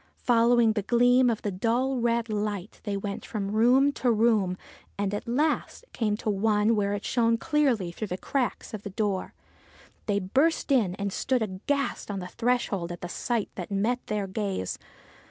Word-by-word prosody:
Following 235 -1 +4
the 215 - -1
gleam 245 +4 +4
of 225 -2 -2
the 205 - -1
dull, 240 +7 0
red 235 -1 +1
light, 210 -2 -3
they 205 -2 -1
went 200 0 -5
from 200 -3 -4
room 250 +6 +4
to 255 -3 0
room, 215 -5 +2 0.4
and 200 0 -1
at 205 - -4
last 295 - 0
came 210 -3 0
to 215 - -3
one 210 +2 +2
where 200 -1 0
it 200 - -6
shone 230 -1 +2
clearly 265 - +1
through 215 +5 -5
the 180 - -4
cracks 255 +2 -2
of 215 - -5
the 205 - -6
door. 200 -1 -2 0.7
They 205 -1 +1
burst 270 - +1
in, 215 -9 +3
and 200 -1 -3
stood 255 -3 0
aghast 230 +9 -2
on 200 - -3
the 180 - -5
threshold 220 -6 -1
at 175 - -7
the 175 - -5
sight 235 +2 -2
that 180 - -6
met 220 +5 -1
their 210 -2 -1
gaze. 195 - -3
215 Hz, 180 wpm, -27 LUFS, 200-245 Hz, 0.7 s, Following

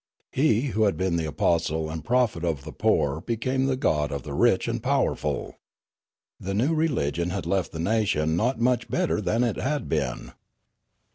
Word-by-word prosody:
He 125 -5 +3
who 110 +1 +3
had 100 - +1
been 95 -2 0
the 80 -2 -1
apostle 80 +1 0
and 80 -1 -5
prophet 120 -7 +1
of 80 -6 -1
the - - -8
poor 75 +2 +1
be 115 +4 -2
came 130 +4 0
the 130 -1 0
god 75 - +1
of 70 -3 -4
the - - -6
rich - - +3
and - - -2
powerful. - - -1 0.8
The 95 +1 -3
new 130 +10 +2
religion 90 - 0
had 95 +2 -3
left 95 -3 0
the - - -7
nation 85 -5 +1
not 115 +6 0
much 120 0 +1
better 175 -11 0
than 115 +4 +1
it 115 -4 0
had 145 +2 -2
been. 70 -6 -2
100 Hz, 185 wpm, -25 LUFS, 80-125 Hz, 0.8 s, He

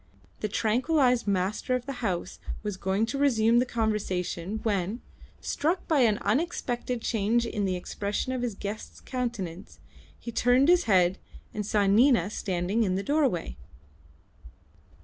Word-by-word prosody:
The 215 - -1
tranquillised 250 +3 +2
master 200 +6 0
of 250 -1 -3
the 270 -3 -6
house 185 -7 -2 0.2
was 210 -2 -3
going 190 +3 0
to 275 +4 -4
resume 235 -4 +4
the 250 - +1
conversation 210 -4 -2
when, 205 +1 -1 0.4
struck 335 +5 -1
by 310 -3 +3
an 220 -5 +4
unexpected 245 -3 -1
change 230 +2 +1
in 210 -3 -2
the 185 -1 0
expression 200 +6 -3
of 255 - -2
his 240 -4 -2
guest's 205 +2 -6
countenance, 215 -8 -5 0.4
he 235 - -7
turned 250 +5 +3
his 355 0 +5
head 185 -3 +3 0.3
and 210 - -3
saw 205 0 +1
Nina 210 -1 +4
standing 190 +2 -1
in 190 -4 +1
the 195 - -2
doorway. 265 - 0
220 Hz, 145 wpm, -27 LUFS, 195-250 Hz, 0.4 s, his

